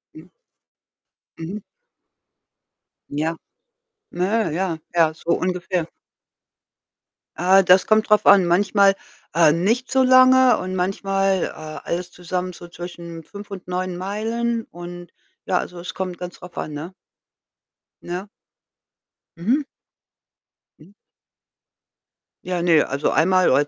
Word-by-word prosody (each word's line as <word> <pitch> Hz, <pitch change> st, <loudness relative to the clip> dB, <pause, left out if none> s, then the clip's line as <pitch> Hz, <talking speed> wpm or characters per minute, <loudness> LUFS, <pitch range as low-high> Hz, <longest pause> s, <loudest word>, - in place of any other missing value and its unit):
Mhm. 160 Hz, +3 st, -14 dB, 1.1 s
Mhm. 175 Hz, +6 st, -6 dB, 1.5 s
Ja. 155 Hz, +3 st, -2 dB, 0.7 s
Nö, 190 Hz, +1 st, 0 dB
ja, 170 Hz, 0 st, -1 dB, 0.2 s
ja, 165 Hz, -2 st, +3 dB
so 165 Hz, -, -12 dB
ungefähr. 180 Hz, -1 st, -1 dB, 1.5 s
Äh, 190 Hz, +3 st, +5 dB
das 185 Hz, +1 st, +5 dB
kommt 215 Hz, 0 st, +2 dB
drauf 210 Hz, 0 st, +4 dB
an. 195 Hz, -3 st, +7 dB
Manchmal, 195 Hz, +2 st, +3 dB, 0.4 s
äh, 165 Hz, -1 st, +5 dB
nicht 220 Hz, -, 0 dB
so 265 Hz, 0 st, +4 dB
lange 255 Hz, 0 st, +6 dB
und 185 Hz, 0 st, -4 dB
manchmal, 195 Hz, 0 st, 0 dB
äh, -, -, 0 dB, 0.4 s
alles 175 Hz, +1 st, -4 dB
zusammen 180 Hz, +1 st, -4 dB
so 175 Hz, -, -11 dB
zwischen 170 Hz, -1 st, -9 dB
5 205 Hz, +4 st, -11 dB
und 190 Hz, -3 st, -8 dB
9 180 Hz, 0 st, -3 dB
Meilen 225 Hz, +5 st, -2 dB
und 175 Hz, 0 st, -9 dB, 0.3 s
ja 180 Hz, -, +1 dB
also, 180 Hz, -, -6 dB
es 175 Hz, -, -7 dB
kommt 185 Hz, -1 st, -4 dB
ganz 180 Hz, -1 st, -8 dB
drauf 180 Hz, -, -13 dB
an, 155 Hz, -, -4 dB
ne? 155 Hz, +5 st, -7 dB, 1.1 s
Ne? 180 Hz, +3 st, -5 dB, 1.1 s
Mhm. 245 Hz, -, 0 dB, 1.1 s
Mhm. 160 Hz, +5 st, -18 dB, 1.5 s
Ja, 180 Hz, -1 st, -2 dB
ne, 165 Hz, -3 st, +4 dB
also, 140 Hz, +2 st, -1 dB
einmal 185 Hz, +2 st, +3 dB
oder 145 Hz, +3 st, +3 dB
180 Hz, 115 wpm, -22 LUFS, 170-200 Hz, 1.5 s, an